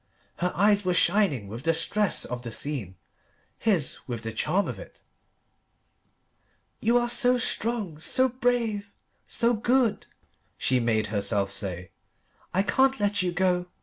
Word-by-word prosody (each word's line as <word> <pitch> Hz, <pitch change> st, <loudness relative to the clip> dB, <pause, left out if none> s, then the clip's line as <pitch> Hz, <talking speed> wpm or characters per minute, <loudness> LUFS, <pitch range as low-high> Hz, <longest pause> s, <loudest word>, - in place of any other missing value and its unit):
Her 180 Hz, +1 st, -1 dB
eyes 205 Hz, +1 st, +3 dB
were 180 Hz, -1 st, 0 dB
shining 175 Hz, -, +2 dB
with 115 Hz, +4 st, -7 dB
the 165 Hz, +3 st, +1 dB
stress 200 Hz, +5 st, 0 dB
of 125 Hz, -1 st, -5 dB
the 120 Hz, -1 st, -6 dB
scene: 110 Hz, -, -4 dB, 0.6 s
his 185 Hz, -, +1 dB
with 120 Hz, -3 st, -5 dB
the 110 Hz, 0 st, -4 dB
charm 190 Hz, -, 0 dB
of -, -, -6 dB
it. -, -, -13 dB, 1.8 s
"You 235 Hz, +2 st, +3 dB
are 240 Hz, 0 st, +1 dB
so 250 Hz, +1 st, +3 dB
strong, 220 Hz, -9 st, -1 dB
so 260 Hz, +10 st, +3 dB
brave, 235 Hz, -5 st, -1 dB, 0.4 s
so 235 Hz, 0 st, +1 dB
good," 240 Hz, +1 st, +1 dB, 0.5 s
she 130 Hz, -1 st, +1 dB
made 110 Hz, -2 st, +1 dB
herself 100 Hz, -1 st, 0 dB
say. 90 Hz, -3 st, -4 dB, 0.6 s
"I 190 Hz, -, +1 dB
can't 265 Hz, +4 st, +2 dB
let 205 Hz, -1 st, +1 dB
you 180 Hz, -1 st, -1 dB
go. 180 Hz, 0 st, 0 dB
185 Hz, 145 wpm, -26 LUFS, -, 1.8 s, eyes